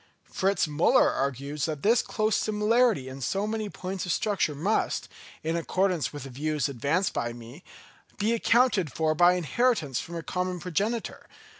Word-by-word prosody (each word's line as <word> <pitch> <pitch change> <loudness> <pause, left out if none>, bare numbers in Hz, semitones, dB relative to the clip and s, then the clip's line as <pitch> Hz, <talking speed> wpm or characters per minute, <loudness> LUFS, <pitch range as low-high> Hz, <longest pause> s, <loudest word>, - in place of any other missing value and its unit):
Fritz 195 -1 0
Müller 155 +2 +3
argues 140 +2 -2
that 155 -3 -4
this 230 +3 +4
close 215 0 0
similarity 215 - +2
in 130 +1 -8
so 195 - -1
many 215 -1 -3
points 190 0 -5
of - - 0
structure 195 -6 0
must, 190 +10 0 0.4
in 165 +1 -1
accordance 180 0 0
with 145 -3 -7
the 135 - -9
views 150 +3 -1
advanced 145 +8 0
by 120 0 -2
me, 120 +7 -12 0.5
be 215 +3 +1
accounted 230 - +2
for 155 +2 +1
by 175 +3 +5
inheritance 180 - 0
from 170 - -7
a 165 - -4
common 180 0 -2
progenitor. 205 +8 -3
175 Hz, 160 wpm, -27 LUFS, 145-210 Hz, 0.5 s, by